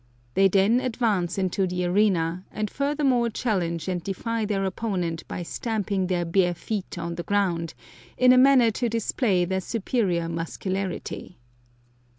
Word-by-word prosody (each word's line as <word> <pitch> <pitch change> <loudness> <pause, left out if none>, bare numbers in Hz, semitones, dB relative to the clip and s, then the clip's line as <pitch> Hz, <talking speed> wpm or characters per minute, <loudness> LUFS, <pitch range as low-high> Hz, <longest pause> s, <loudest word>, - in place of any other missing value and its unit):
They 195 +8 +5
then 200 +5 +3
advance 220 -8 0
into 190 0 0
the 180 0 -2
arena, 180 -2 +1
and 215 -1 -3
furthermore 280 -4 +1
challenge 180 -8 -2
and 180 -2 -1
defy 225 +3 -2
their 200 -2 -1
opponent 185 -5 -2
by 175 - -5
stamping 200 -1 -2
their 175 -2 0
bare 175 +1 +2
feet 195 +1 -5
on 170 0 -3
the 170 - -4
ground, 170 -4 0 0.4
in 255 0 +6
a - - +5
manner 255 -3 +6
to 240 +2 -1
display 220 -4 +1
their 190 +1 -1
superior 195 -5 -1
muscularity. 180 +3 -4
195 Hz, 145 wpm, -25 LUFS, 175-225 Hz, 0.4 s, in